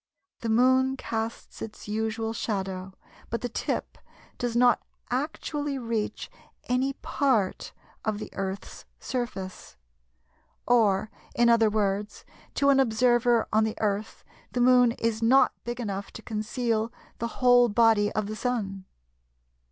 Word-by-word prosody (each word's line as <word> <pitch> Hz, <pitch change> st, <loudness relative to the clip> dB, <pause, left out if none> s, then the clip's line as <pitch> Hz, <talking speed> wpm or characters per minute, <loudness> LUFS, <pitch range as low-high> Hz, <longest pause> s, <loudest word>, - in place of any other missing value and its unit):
The 230 Hz, -, -3 dB
Moon 260 Hz, +3 st, +3 dB
casts 225 Hz, -2 st, -5 dB
its 215 Hz, -, -8 dB
usual 220 Hz, +1 st, -2 dB
shadow, 190 Hz, -4 st, -3 dB, 0.4 s
but 230 Hz, -, -3 dB
the 245 Hz, -, -3 dB
tip -, -, -3 dB, 0.4 s
does 240 Hz, -1 st, -2 dB
not 245 Hz, 0 st, +4 dB, 0.3 s
actually 290 Hz, +1 st, -2 dB
reach 230 Hz, -4 st, -3 dB, 0.4 s
any 255 Hz, +2 st, 0 dB
part 240 Hz, -10 st, 0 dB, 0.3 s
of 215 Hz, -2 st, -1 dB
the 215 Hz, -, -7 dB
Earth's 195 Hz, 0 st, -5 dB
surface. 215 Hz, -7 st, -5 dB, 0.9 s
Or, 215 Hz, -3 st, +3 dB, 0.2 s
in 240 Hz, 0 st, +4 dB
other 225 Hz, -2 st, +5 dB
words, 205 Hz, -1 st, -1 dB, 0.3 s
to 280 Hz, -, +3 dB
an 275 Hz, -1 st, +5 dB
observer 240 Hz, -1 st, +3 dB
on 220 Hz, +1 st, +4 dB
the 220 Hz, 0 st, -2 dB
Earth 210 Hz, 0 st, -2 dB, 0.3 s
the 250 Hz, -, -1 dB
Moon 250 Hz, -1 st, +5 dB
is 225 Hz, -1 st, -1 dB
not 255 Hz, +4 st, +5 dB
big 240 Hz, +1 st, -4 dB
enough 200 Hz, -4 st, -4 dB
to 225 Hz, -, -9 dB
conceal 220 Hz, +1 st, -1 dB, 0.3 s
the 235 Hz, -, -1 dB
whole 245 Hz, -1 st, +5 dB
body 220 Hz, -1 st, +4 dB
of 215 Hz, -, -1 dB
the 215 Hz, +1 st, -5 dB
Sun. 205 Hz, -6 st, -3 dB
225 Hz, 130 wpm, -27 LUFS, 210-245 Hz, 0.9 s, other